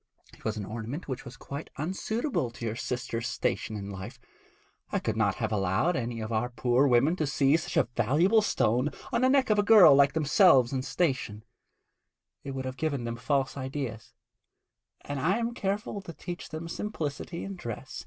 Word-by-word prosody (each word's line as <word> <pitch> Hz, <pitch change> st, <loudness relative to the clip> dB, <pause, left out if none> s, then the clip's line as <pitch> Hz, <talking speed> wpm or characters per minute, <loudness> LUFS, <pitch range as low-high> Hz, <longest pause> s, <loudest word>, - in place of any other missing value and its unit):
It -, -, -18 dB
was 110 Hz, -1 st, -2 dB
an 105 Hz, -, -4 dB
ornament 115 Hz, -, -6 dB
which 130 Hz, -1 st, -5 dB
was 125 Hz, -1 st, -10 dB
quite 140 Hz, +6 st, -7 dB
unsuitable 190 Hz, -, -2 dB
to 120 Hz, 0 st, -8 dB
your 110 Hz, -1 st, -2 dB
sister's 115 Hz, -1 st, -3 dB
station 110 Hz, -, -2 dB
in 100 Hz, -1 st, -6 dB
life. 100 Hz, +6 st, -8 dB, 0.7 s
I -, -, +1 dB
could 110 Hz, -, -2 dB
not 105 Hz, -4 st, +1 dB
have 110 Hz, -2 st, -2 dB
allowed 100 Hz, -, +1 dB
any 115 Hz, -2 st, -3 dB
of 110 Hz, +1 st, -5 dB
our 115 Hz, +3 st, 0 dB
poor 125 Hz, +2 st, +2 dB
women 135 Hz, +6 st, +4 dB
to 155 Hz, -, 0 dB
see 135 Hz, +1 st, +3 dB
such 165 Hz, -, -2 dB
a -, -, +6 dB
valuable 185 Hz, -, +3 dB
stone 125 Hz, -, +1 dB, 0.2 s
on 235 Hz, -, +1 dB
the 255 Hz, -, +4 dB
neck 265 Hz, -3 st, +3 dB
of 210 Hz, -, +3 dB
a -, -, +6 dB
girl 205 Hz, -7 st, +8 dB
like 140 Hz, 0 st, +5 dB
themselves 150 Hz, -, +5 dB
in 130 Hz, -, 0 dB
station; 130 Hz, -8 st, -1 dB, 1.0 s
it 135 Hz, -1 st, -6 dB
would 130 Hz, 0 st, -4 dB
have 130 Hz, 0 st, -5 dB
given 145 Hz, -5 st, -1 dB
them 115 Hz, 0 st, -3 dB
false 135 Hz, +3 st, 0 dB
ideas, 130 Hz, -4 st, -5 dB, 0.9 s
and 145 Hz, -1 st, -5 dB
I 180 Hz, -, +2 dB
am 235 Hz, 0 st, -2 dB
careful 200 Hz, -1 st, -3 dB
to 175 Hz, -3 st, -9 dB
teach 175 Hz, +1 st, -7 dB
them 160 Hz, +1 st, -6 dB
simplicity 170 Hz, -3 st, -4 dB
in 195 Hz, 0 st, -5 dB
dress. 120 Hz, -, -7 dB
135 Hz, 190 wpm, -28 LUFS, 115-170 Hz, 1.0 s, girl